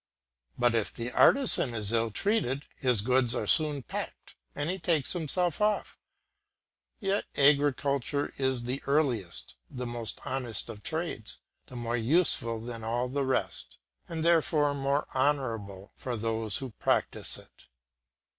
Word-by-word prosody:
But 120 -1 +3
if 115 -3 0
the 120 +1 -5
artisan 190 - +5
is 105 -2 0
ill 115 0 +2
treated 145 - 0
his 125 -6 +1
goods 125 0 +2
are - - -2
soon 150 -4 +5
packed - - -6 0.2
and 145 - -2
he 185 +2 -2
takes 160 -5 +1
himself 175 +1 0
off. 210 0 0 1.0
Yet 200 -1 0
agriculture 140 0 +2
is 130 -2 0
the 125 +3 -3
earliest, 130 - -1
the 125 -1 -5
most 120 -4 -4
honest 125 -5 -2
of 105 -2 -8
trades, 160 -8 -3 0.3
and 125 - -8
more 120 +1 -1
useful 115 -3 +2
than 115 0 -7
all 120 +3 -1
the 140 +2 -1
rest, 130 - -2 0.3
and 165 -1 -3
therefore 160 -3 +3
more 140 +1 -1
honourable 115 -9 -1
for 125 -2 -4
those 110 -1 -1
who 135 -3 -6
practise - - 0
it. - - -17
130 Hz, 140 wpm, -29 LUFS, 115-150 Hz, 1.0 s, artisan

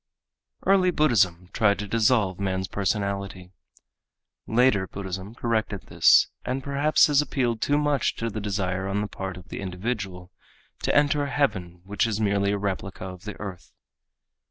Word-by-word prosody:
Early 190 -1 +4
Buddhism 95 - +2
tried 100 -2 +3
to 105 - -5
dissolve 110 -3 +2
man's 95 -1 -1
personality. 100 -2 -3 1.0
Later 110 -5 +3
Buddhism 95 +2 -6
corrected 110 -4 -1
this - - +6 0.2
and 130 +1 -3
perhaps 140 +2 +3
has 145 -3 +4
appealed 120 -6 -1
too 145 - +2
much 150 -2 +1
to 115 0 -3
the 110 - -4
desire 95 -2 -2
on 100 +1 -1
the 105 - -2
part 95 -2 -6
of 90 - -13
the - - -6
individual 95 -1 -4 0.5
to - - 0
enter 145 0 +3
a - - -4
heaven 90 -12 -1
which 105 +4 0
is 110 -2 -2
merely 100 -1 +1
a 100 - 0
replica 95 -1 -4
of 90 0 -9
the 105 - -7
earth. 100 -4 -8
100 Hz, 155 wpm, -25 LUFS, 95-120 Hz, 1.0 s, this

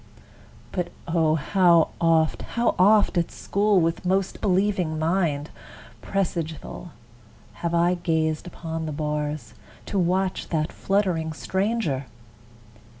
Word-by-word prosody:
But 180 -2 -2 0.2
O! 165 -2 +2
how 170 +1 +4
oft, 165 -1 +3
How 235 0 0
oft, 205 -1 +5
at 170 - -1
school, 205 -1 +1
with 165 0 0
most 190 +1 0
believing 185 -4 +1
mind, 160 -3 0 0.5
Presageful, 170 -3 -3 0.7
have 170 0 0
I 170 +1 +3
gazed 160 -2 -1
upon 165 -2 -5
the - - -3
bars, 150 0 -3 0.3
To 200 - -1
watch 185 +2 0
that 155 -1 -1
fluttering 180 -5 0
stranger! 190 - -1
170 Hz, 110 wpm, -24 LUFS, 160-190 Hz, 0.7 s, oft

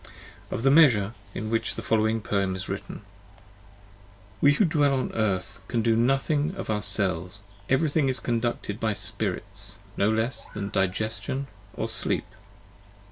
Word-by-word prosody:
OF 115 - -3
THE 135 - +5
MEASURE, 120 -9 +6 0.2
IN 110 0 -3
WHICH 115 - 0
THE - - -5
FOLLOWING 110 0 +2
PoEM 100 -3 0
IS 95 - -4
WRITTEN. 100 - -5
30 - - -11 1.4
We 145 - +6
who 200 - +3
dwell 145 -4 +3
on 130 - -1
Earth 100 -2 -1
can 115 -2 0
do 115 0 +3
nothing 140 +7 +1
of 190 - -3
ourselves, 100 -2 0 0.3
every 145 +3 +3
thing 145 -3 +2
is 130 - +2
conducted 120 -3 -2
by 110 -2 +1
Spirits, - - -4 0.2
no 100 - +3
less 110 +1 -1
than 100 -1 -3
Digestion 110 +8 -1 0.3
or - - -2
Sleep - - -1
110 Hz, 150 wpm, -26 LUFS, 100-135 Hz, 1.4 s, MEASURE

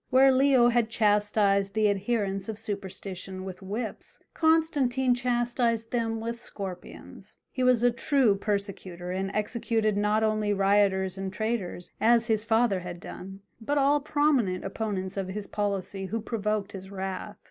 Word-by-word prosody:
Where 265 +1 +6
Leo 260 -2 +5
had 240 -2 +2
chastised 205 -2 +2
the 215 -1 +3
adherents 200 -1 -1
of 215 - -4
superstition 190 -3 -6
with 185 0 -8
whips 210 +4 -5 0.2
Constantine 285 -6 +2
chastised 240 -2 0
them 225 -2 -1
with 230 +1 -4
scorpions. 190 -6 -9 0.2
He 255 - -4
was 250 -2 +4
a 245 - +5
true 245 -2 +2
persecutor, 195 -3 -3
and 190 +1 -2
executed 215 0 0
not 210 +1 +2
only 215 -1 +1
rioters 195 -1 +2
and 190 0 -3
traitors, 205 -3 -3
as 235 +1 +4
his 220 -2 +1
father 225 -3 +2
had 175 -1 -7
done, 195 +3 -9 0.2
but 290 +6 0
all 285 +1 +4
prominent 280 -11 +1
opponents 195 -3 -3
of 195 -1 -2
his 200 +2 -5
policy 200 -1 -3
who 225 +5 -2
provoked 210 -2 -2
his 190 -2 -9
wrath. 190 -1 -5
210 Hz, 145 wpm, -27 LUFS, 195-240 Hz, 0.2 s, Where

